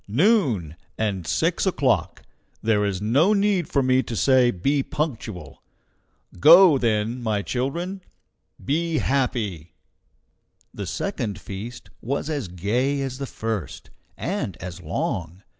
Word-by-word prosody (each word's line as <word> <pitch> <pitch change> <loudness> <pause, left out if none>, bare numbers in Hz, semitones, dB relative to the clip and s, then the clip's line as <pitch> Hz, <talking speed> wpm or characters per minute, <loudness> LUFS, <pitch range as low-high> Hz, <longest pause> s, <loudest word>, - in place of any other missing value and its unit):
Noon, 120 - +2 0.2
and 100 -6 -2
six - - +1
o'clock! - - 0 0.4
There 110 -2 +2
is 100 -1 -2
no 140 - +3
need 200 -4 +1
for 140 - +2
me 130 0 +3
to 120 - -6
say 125 +4 +4
be 135 +8 0
punctual! 115 - -5 0.8
Go, 170 - +8
then, 115 +1 0
my 105 -3 -1
children 170 - -3 0.6
be 165 +3 0
happy!" 105 - -1 1.0
The - - -6
second 105 -4 -3
feast 110 +5 -8
was 140 +5 -2
as 145 -9 -2
gay 115 +11 -1
as 130 0 -5
the 140 - -4
first, 110 -8 -5 0.3
and 160 - -3
as 90 -1 -8
long. 90 +1 -3
120 Hz, 125 wpm, -24 LUFS, 100-145 Hz, 1.0 s, Go